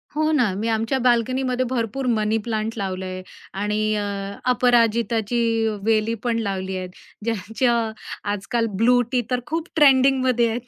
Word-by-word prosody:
हो 310 +1 +1
ना. 245 -10 +2
मी 220 +2 -2
आमच्या 225 +4 0
बाल्कनीमध्ये 255 +1 +1
भरपूर 255 +1 -2
मनी 215 -1 +1
प्लांट 220 -1 -2
लावलं 190 -2 -3
आहे 185 0 -5 0.4
आणि 215 +1 0
अ, 210 - -1 0.5
अपराजिताची 235 -2 +2 0.4
वेली 225 0 +2
पण 235 -1 0
लावली 190 -3 -3
आहेत. 185 0 -5 0.4
ज्यांच्या 230 +2 0 0.6
आजकाल 215 +4 -1
ब्लू 245 +3 +4
टी 250 -1 +2
तर 250 - +1
खूप 325 +2 -3
ट्रेंडिंगमध्ये 260 -4 +4
आहेत. 240 +2 -4
230 Hz, 140 wpm, -22 LUFS, 215-250 Hz, 0.6 s, ब्लू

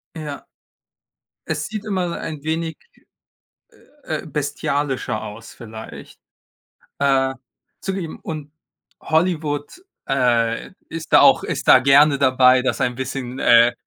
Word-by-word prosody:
Ja. 150 -3 -7 1.0
Es 155 -1 -2
sieht 215 +3 -6
immer 185 -5 -2
ein 155 -3 -6
wenig, 160 +1 -2 1.3
äh, 155 +1 -4
bestialischer 145 -5 -2
aus 110 +1 -9
vielleicht, 110 -1 -11 0.8
äh, 135 -1 +2 0.5
zugegeben. 190 -4 -4
Und 150 -2 -7 0.5
Hollywood, 160 - -1 0.2
äh, 120 -3 +1 0.2
ist 165 -1 -7
da - - +8
auch - - +6
ist - - -4
da - - +8
gerne 140 +2 +5
dabei, 130 -1 +5
das 130 +1 -1
ein 125 -2 0
bisschen, 130 0 -5
äh 120 0 +6
140 Hz, 110 wpm, -21 LUFS, 130-160 Hz, 1.3 s, da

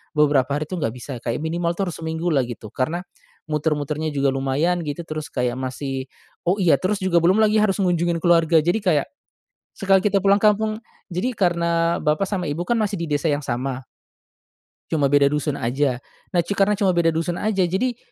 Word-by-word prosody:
beberapa 145 -4 +3
hari 145 +2 -1
tuh 180 +3 -5
gak 115 -5 -2
bisa, 125 0 -7
kayak 120 +5 -3
minimal 170 +1 -1
tuh 190 -1 -2
harus - - -10
seminggu 160 +2 -2
lah 140 - +3
gitu. 110 -3 -8
Karena 165 +7 -2 0.5
muter-muternya 150 0 -1
juga 140 -1 +2
lumayan 135 +7 0
gitu, 150 +2 -4
terus 155 -1 -5
kayak 125 0 -2
masih 130 0 -4 0.4
oh, 180 - +4
iya, 170 -9 +3
terus 195 +4 -1
juga 175 -2 +3
belum 175 +4 +3
lagi 215 0 +3
harus 210 -2 +2
ngunjungin 175 -2 0
keluarga. 165 -2 +4
Jadi 175 +6 +1
kayak 180 -9 +1 0.7
sekali 195 -1 +3
kita 205 -1 +2
pulang 200 +1 +3
kampung 215 +1 +2 0.3
jadi 185 +8 0
karena 170 -2 +1
bapak 155 +5 +1
sama 180 -6 -2
ibu 165 +4 -3
kan 240 - +1
masih 205 -1 -1
di 170 - -2
desa 145 +1 0
yang 145 -1 -2
sama 130 +1 -3 1.1
cuma 145 -4 +2
beda 145 0 +4
dusun 150 0 -1
aja. 130 +2 0 0.3
Nah 180 - +1
cu 200 - -2
karena 200 +1 +2
cuma 195 -3 +2
beda 170 -1 +3
dusun 165 +2 -1
aja 200 -4 +1
jadi 215 +8 -1
165 Hz, 190 wpm, -22 LUFS, 145-185 Hz, 1.1 s, oh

